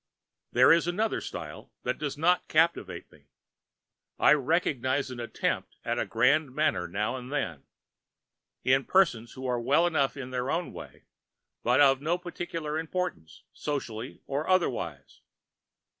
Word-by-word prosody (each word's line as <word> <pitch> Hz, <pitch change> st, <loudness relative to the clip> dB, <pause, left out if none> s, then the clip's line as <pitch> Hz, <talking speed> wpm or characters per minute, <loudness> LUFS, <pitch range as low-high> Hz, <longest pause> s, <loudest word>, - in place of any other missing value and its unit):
There 125 Hz, +1 st, +6 dB
is 170 Hz, 0 st, +2 dB
another 210 Hz, +6 st, 0 dB
style -, -, -8 dB
which -, -, -2 dB
does 145 Hz, -1 st, -3 dB
not 175 Hz, +4 st, +2 dB
captivate 155 Hz, -, +1 dB
me. -, -, -21 dB, 0.9 s
I -, -, +6 dB
recognize 140 Hz, -3 st, 0 dB
an 125 Hz, -, -7 dB
attempt 120 Hz, -, -2 dB
at -, -, -1 dB
the -, -, -1 dB
grand 135 Hz, +4 st, +2 dB
manner 150 Hz, -13 st, +1 dB
now 105 Hz, +7 st, -2 dB
and 125 Hz, +1 st, -9 dB
then, 90 Hz, -, -3 dB, 1.0 s
in 135 Hz, +1 st, +3 dB
persons 120 Hz, -, +2 dB
who 130 Hz, -, -8 dB
are 125 Hz, -2 st, 0 dB
well 145 Hz, +8 st, +3 dB
enough 145 Hz, -5 st, +1 dB
in 130 Hz, -2 st, -6 dB
their 125 Hz, -1 st, -2 dB, 0.2 s
way, -, -, -11 dB, 0.6 s
but 125 Hz, +3 st, +3 dB
of 135 Hz, -1 st, +5 dB
no 165 Hz, +4 st, +1 dB
particular 165 Hz, -3 st, -4 dB
importance, 165 Hz, -, -4 dB
socially 125 Hz, -5 st, -5 dB
or 140 Hz, +3 st, -2 dB
otherwise. 115 Hz, -, -1 dB
140 Hz, 140 wpm, -28 LUFS, 125-160 Hz, 1.0 s, There